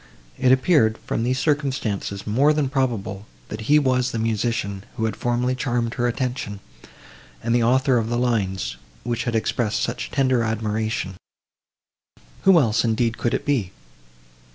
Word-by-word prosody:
It 130 Hz, -, +4 dB
appeared, 130 Hz, -5 st, +4 dB
from -, -, -1 dB
these 125 Hz, +2 st, 0 dB
circumstances, 135 Hz, -9 st, -1 dB
more 135 Hz, +8 st, +3 dB
than 150 Hz, -3 st, 0 dB
probable, 115 Hz, -7 st, -2 dB, 0.2 s
that 110 Hz, +2 st, -6 dB
he 150 Hz, -, +7 dB
was 130 Hz, -3 st, +2 dB
the 115 Hz, -, -4 dB
musician, 110 Hz, -3 st, -1 dB
who 110 Hz, -, 0 dB
had 110 Hz, -, -2 dB
formerly 120 Hz, +1 st, 0 dB
charmed 120 Hz, -3 st, -1 dB
her 120 Hz, -1 st, 0 dB
attention, 120 Hz, -4 st, -3 dB, 0.8 s
and 115 Hz, 0 st, 0 dB
the 120 Hz, -, +3 dB
author 130 Hz, +1 st, +3 dB
of 115 Hz, 0 st, -2 dB
the 120 Hz, -, 0 dB
lines, 95 Hz, -, -1 dB, 0.3 s
which 120 Hz, 0 st, -2 dB
had 120 Hz, -2 st, -1 dB
expressed 110 Hz, -1 st, 0 dB
such -, -, -3 dB
tender 130 Hz, -3 st, +2 dB
admiration;—who 110 Hz, -3 st, -2 dB, 1.4 s
else, 115 Hz, -6 st, +2 dB
indeed, 115 Hz, 0 st, 0 dB
could 120 Hz, -, 0 dB
it -, -, -4 dB
be? 125 Hz, -11 st, 0 dB
120 Hz, 150 wpm, -23 LUFS, 110-130 Hz, 1.4 s, he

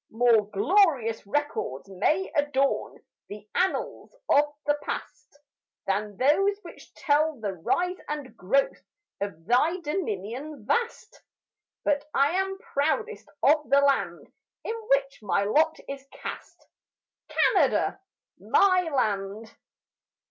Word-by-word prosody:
More 225 Hz, -2 st, +3 dB
glorious 235 Hz, -, +2 dB
records 205 Hz, -, -2 dB
may 260 Hz, -, 0 dB
adorn 280 Hz, -2 st, 0 dB, 0.3 s
The 210 Hz, 0 st, -9 dB
annals 380 Hz, +6 st, -1 dB
of 290 Hz, +1 st, +5 dB, 0.2 s
the 290 Hz, -, +3 dB
past -, -, -7 dB, 0.5 s
Than 205 Hz, +1 st, -2 dB
those 390 Hz, -, +3 dB
which -, -, -13 dB
tell 305 Hz, -2 st, +1 dB
the 205 Hz, -3 st, -3 dB
rise 360 Hz, -, -1 dB
and 295 Hz, -3 st, -5 dB
growth 270 Hz, +10 st, 0 dB, 0.4 s
Of 175 Hz, -5 st, -5 dB
thy 300 Hz, -, +2 dB
dominion 275 Hz, -, -4 dB
vast; 470 Hz, -, -2 dB, 0.6 s
But 295 Hz, 0 st, 0 dB
I 275 Hz, +2 st, +4 dB
am 385 Hz, +1 st, -1 dB
proudest 435 Hz, +2 st, -2 dB
of 300 Hz, +1 st, +3 dB
the 280 Hz, -, +6 dB
land 280 Hz, -1 st, 0 dB, 0.3 s
In 445 Hz, -, -3 dB, 0.2 s
which 275 Hz, 0 st, +1 dB
my 200 Hz, -1 st, +1 dB
lot 310 Hz, +10 st, +2 dB
is 275 Hz, 0 st, -7 dB
cast, -, -, -9 dB, 0.6 s
Canada, -, -, +2 dB, 0.4 s
my 370 Hz, -2 st, +4 dB
land. 210 Hz, -3 st, -2 dB
275 Hz, 110 wpm, -26 LUFS, 215-315 Hz, 0.6 s, the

